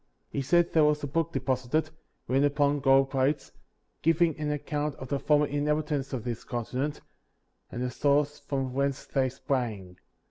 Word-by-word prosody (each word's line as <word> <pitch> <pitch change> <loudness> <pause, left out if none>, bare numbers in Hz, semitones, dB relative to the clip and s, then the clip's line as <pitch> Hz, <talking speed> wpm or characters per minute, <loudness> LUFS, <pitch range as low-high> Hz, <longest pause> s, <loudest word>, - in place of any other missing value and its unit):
34. - - -6
He - - +1
said 170 +5 +2
there 160 - +5
was 150 0 +2
a - - -1
book 165 +3 -1
deposited, 130 +3 -1 0.4
written 135 +2 +2
upon 145 0 +2
gold 135 0 +4
plates, 135 +1 0 0.5
giving 165 0 +3
an 150 -1 -1
account 150 0 -2
of 130 - -9
the 140 - 0
former 150 0 +3
inhabitants 145 -1 -1
of 130 -5 -3
this 120 -2 -4
continent, 130 +4 -3 0.7
and 120 - -3
the 125 - -2
source 145 +2 +1
from 135 -2 -3
whence 140 0 -1
they 130 -2 +1
sprang. 115 -9 -3
140 Hz, 170 wpm, -28 LUFS, 130-150 Hz, 0.7 s, there